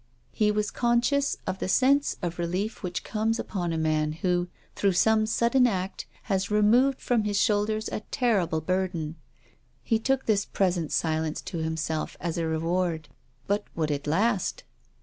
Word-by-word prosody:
He 215 Hz, -2 st, +2 dB
was 210 Hz, 0 st, 0 dB
conscious 245 Hz, +4 st, +1 dB
of 190 Hz, -, -3 dB
the -, -, -2 dB
sense 275 Hz, +7 st, +3 dB
of 175 Hz, 0 st, -3 dB
relief 185 Hz, +6 st, -2 dB
which 180 Hz, -2 st, -4 dB
comes 225 Hz, +1 st, -1 dB
upon 175 Hz, -7 st, -3 dB
a 165 Hz, -, -1 dB
man 155 Hz, -1 st, +1 dB
who, 175 Hz, +2 st, 0 dB, 0.3 s
through 200 Hz, -2 st, +2 dB
some 215 Hz, +4 st, +3 dB
sudden 235 Hz, +3 st, +3 dB
act, 190 Hz, -3 st, -3 dB, 0.2 s
has 195 Hz, -2 st, -1 dB
removed 235 Hz, +6 st, +4 dB
from 235 Hz, -3 st, +1 dB
his 205 Hz, -1 st, 0 dB
shoulders 215 Hz, +1 st, +1 dB
a -, -, -3 dB
terrible 195 Hz, -10 st, +1 dB
burden. 175 Hz, -2 st, -2 dB, 0.7 s
He 225 Hz, -2 st, +1 dB
took 265 Hz, +3 st, 0 dB
this 205 Hz, -2 st, +2 dB
present 180 Hz, -6 st, 0 dB
silence 160 Hz, -1 st, 0 dB
to 170 Hz, -, -5 dB
himself 160 Hz, 0 st, -2 dB
as 170 Hz, 0 st, -3 dB
a 165 Hz, -, 0 dB
reward. 165 Hz, 0 st, -1 dB, 0.4 s
But 205 Hz, +1 st, 0 dB
would 155 Hz, -2 st, 0 dB
it 145 Hz, 0 st, -3 dB
last 195 Hz, +5 st, +1 dB
190 Hz, 160 wpm, -27 LUFS, 165-220 Hz, 0.7 s, removed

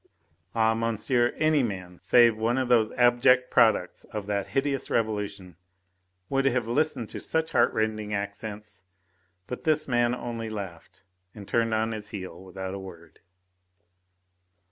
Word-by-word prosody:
Ah, 110 Hz, 0 st, +3 dB
monsieur, 115 Hz, +2 st, +1 dB
any 155 Hz, -2 st, +3 dB
man, 90 Hz, -6 st, -5 dB
save 120 Hz, -3 st, +5 dB
one 115 Hz, +3 st, +1 dB
of 130 Hz, -2 st, -1 dB
those 115 Hz, -3 st, +4 dB
abject 125 Hz, +1 st, +4 dB
products 110 Hz, -6 st, +3 dB
of 105 Hz, -2 st, -6 dB
that 100 Hz, -1 st, -2 dB
hideous 135 Hz, 0 st, -1 dB
Revolution, 105 Hz, -5 st, -2 dB, 0.7 s
would 135 Hz, 0 st, 0 dB
have 125 Hz, -4 st, +1 dB
listened 120 Hz, -1 st, 0 dB
to -, -, -7 dB
such 160 Hz, 0 st, -1 dB
heartrending 110 Hz, -6 st, +1 dB
accents. 105 Hz, -1 st, -5 dB, 0.6 s
But 125 Hz, -, -7 dB
this 155 Hz, -1 st, +2 dB
man 120 Hz, -1 st, +2 dB
only 115 Hz, -2 st, -5 dB
laughed 95 Hz, -7 st, -8 dB, 0.3 s
and 100 Hz, -3 st, -10 dB
turned 115 Hz, -1 st, +1 dB
on 110 Hz, +1 st, 0 dB
his 105 Hz, -2 st, -6 dB
heel 95 Hz, -4 st, -7 dB
without 95 Hz, 0 st, -6 dB
a 100 Hz, -, -5 dB
word. 85 Hz, -4 st, -12 dB
110 Hz, 140 wpm, -27 LUFS, 100-120 Hz, 0.7 s, save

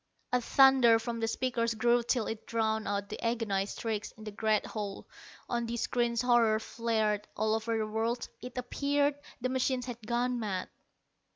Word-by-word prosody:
A 250 Hz, -, +3 dB
thunder 265 Hz, -2 st, +6 dB
from 230 Hz, +1 st, -4 dB
the 225 Hz, -, 0 dB
speakers 230 Hz, -1 st, 0 dB
grew 240 Hz, +2 st, +3 dB
till 235 Hz, -1 st, 0 dB
it 220 Hz, -1 st, -6 dB
drowned 220 Hz, -1 st, 0 dB
out 200 Hz, 0 st, -1 dB
the -, -, -6 dB
agonized 220 Hz, -4 st, -1 dB
shrieks 220 Hz, -2 st, -2 dB
in 220 Hz, -, -11 dB
the 215 Hz, -, -6 dB
great 215 Hz, 0 st, +1 dB
hall. 205 Hz, -3 st, -5 dB, 0.4 s
On 235 Hz, -1 st, -1 dB
the 235 Hz, +1 st, -3 dB
screens 240 Hz, 0 st, 0 dB
horror 235 Hz, -3 st, +4 dB
flared. 220 Hz, -2 st, -1 dB
All 215 Hz, +1 st, +1 dB
over 225 Hz, +1 st, 0 dB
the 220 Hz, -, 0 dB
world, 225 Hz, +3 st, -1 dB
it 250 Hz, 0 st, -8 dB
appeared, 285 Hz, +3 st, +1 dB, 0.3 s
the 255 Hz, -, 0 dB
machines 255 Hz, -1 st, 0 dB
had 235 Hz, -3 st, -8 dB
gone 245 Hz, +1 st, 0 dB
mad. 195 Hz, -5 st, -3 dB
230 Hz, 175 wpm, -31 LUFS, 220-245 Hz, 0.4 s, thunder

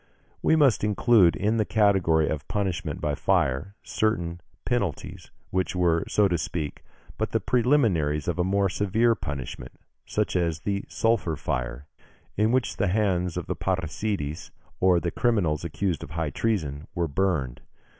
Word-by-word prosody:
We -, -, +4 dB
must 140 Hz, -11 st, +4 dB
include 105 Hz, -3 st, +4 dB
in 105 Hz, +3 st, 0 dB
the 110 Hz, -, +3 dB
category 95 Hz, -8 st, +3 dB
of 75 Hz, -2 st, -3 dB
punishment 95 Hz, -4 st, -2 dB
by 75 Hz, -, 0 dB
fire 70 Hz, +7 st, 0 dB
certain 85 Hz, -6 st, -1 dB, 0.2 s
penalties, 100 Hz, -10 st, -3 dB, 0.2 s
which 95 Hz, 0 st, -1 dB
were, 85 Hz, -2 st, +2 dB
so 105 Hz, -1 st, +3 dB
to 85 Hz, -3 st, 0 dB
speak, 75 Hz, -2 st, -4 dB, 0.4 s
but -, -, -2 dB
the -, -, +3 dB
preliminaries 110 Hz, -, +2 dB
of 90 Hz, 0 st, -1 dB
a -, -, +3 dB
more 100 Hz, +2 st, +2 dB
severe 105 Hz, +5 st, +2 dB
punishment, 70 Hz, -, -6 dB, 0.3 s
such -, -, -1 dB
as 85 Hz, -2 st, 0 dB
the 100 Hz, -1 st, -2 dB
sulphur 110 Hz, -8 st, 0 dB
fire, 65 Hz, -3 st, -3 dB, 0.5 s
in 110 Hz, +2 st, +2 dB
which 130 Hz, -1 st, 0 dB
the 100 Hz, -, +1 dB
hands 90 Hz, -3 st, 0 dB
of -, -, -3 dB
parricides, 80 Hz, -3 st, -2 dB, 0.3 s
or 90 Hz, -1 st, +4 dB
of 85 Hz, -, -3 dB
criminals 100 Hz, -11 st, +1 dB
accused 85 Hz, +1 st, -2 dB
of -, -, -8 dB
high 80 Hz, -1 st, -3 dB
treason, 80 Hz, -8 st, -2 dB
were 85 Hz, -2 st, 0 dB
burned. 70 Hz, -6 st, -1 dB
90 Hz, 150 wpm, -26 LUFS, 80-105 Hz, 0.5 s, We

